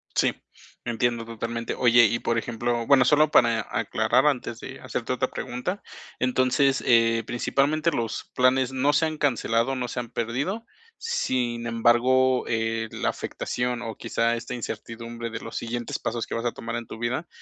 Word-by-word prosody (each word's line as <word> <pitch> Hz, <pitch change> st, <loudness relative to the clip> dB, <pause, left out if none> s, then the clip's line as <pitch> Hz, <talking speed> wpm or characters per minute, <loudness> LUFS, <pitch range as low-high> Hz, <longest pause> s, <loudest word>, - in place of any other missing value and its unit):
Sí, -, -, +3 dB, 0.5 s
entiendo 120 Hz, 0 st, 0 dB
totalmente, 115 Hz, 0 st, -4 dB
oye, 120 Hz, -1 st, +6 dB
y 120 Hz, +3 st, +1 dB
por 115 Hz, -, 0 dB
ejemplo, 120 Hz, 0 st, -1 dB
bueno, 135 Hz, -3 st, +6 dB
solo 150 Hz, +2 st, +4 dB
para 115 Hz, -2 st, +4 dB
aclarar 115 Hz, +4 st, +1 dB
antes 125 Hz, -5 st, 0 dB
de -, -, -9 dB
hacerte -, -, -3 dB
otra -, -, -1 dB
pregunta. 180 Hz, +12 st, -4 dB, 0.4 s
Entonces, 130 Hz, +2 st, +2 dB
eh, 115 Hz, -1 st, +4 dB
principalmente, 145 Hz, +7 st, +1 dB
los 115 Hz, -6 st, -3 dB
planes 130 Hz, 0 st, +3 dB
no 135 Hz, +2 st, +2 dB
se 160 Hz, -, +3 dB
han 155 Hz, -1 st, -3 dB
cancelado, 120 Hz, -2 st, +1 dB
no 125 Hz, -1 st, -2 dB
se 125 Hz, -, -4 dB
han 120 Hz, -, -5 dB
perdido. 140 Hz, -, -2 dB, 0.3 s
Sin 125 Hz, -, -1 dB
embargo, 125 Hz, +3 st, +3 dB
eh, 115 Hz, 0 st, -1 dB
la -, -, -2 dB
afectación 125 Hz, 0 st, -3 dB
o 115 Hz, -2 st, -5 dB
quizá 115 Hz, 0 st, 0 dB
esta 115 Hz, 0 st, -6 dB
incertidumbre 115 Hz, 0 st, -6 dB
de 115 Hz, -, -5 dB
los -, -, -9 dB
siguientes 120 Hz, 0 st, -3 dB
pasos 115 Hz, 0 st, -3 dB
que -, -, -4 dB
vas 115 Hz, -, -2 dB
a 120 Hz, -, +1 dB
tomar 115 Hz, 0 st, -6 dB
en 120 Hz, -1 st, -5 dB
tu -, -, -8 dB
vida, 125 Hz, +8 st, -2 dB
120 Hz, 170 wpm, -25 LUFS, 115-130 Hz, 0.5 s, oye